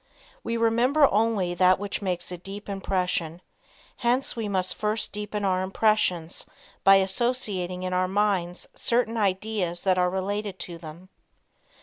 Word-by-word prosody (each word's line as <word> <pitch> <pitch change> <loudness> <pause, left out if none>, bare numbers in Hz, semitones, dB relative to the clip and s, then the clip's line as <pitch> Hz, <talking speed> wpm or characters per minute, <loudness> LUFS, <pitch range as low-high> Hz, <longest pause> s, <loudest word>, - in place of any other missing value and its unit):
We 230 - -2
remember 240 +6 +4
only 210 -4 +1
that 185 +1 +4
which 205 +1 -4
makes 180 -2 -2
a 180 - -5
deep 195 +3 -9
impression, 180 -4 -2 0.6
hence 245 +2 0
we 225 -3 -3
must 185 -2 +2
first 215 0 -2
deepen 210 0 -4
our 185 -1 +1
impressions 190 -4 +1 0.4
by 195 0 +8
associating 190 -3 0
in 185 0 -2
our 185 0 +2
minds 190 -3 0
certain 235 -1 +1
ideas 195 -3 -1
that 185 -1 +3
are 180 0 +3
related 195 +1 -3
to 170 -2 -7
them. 165 +3 -11
195 Hz, 140 wpm, -26 LUFS, 180-215 Hz, 0.6 s, by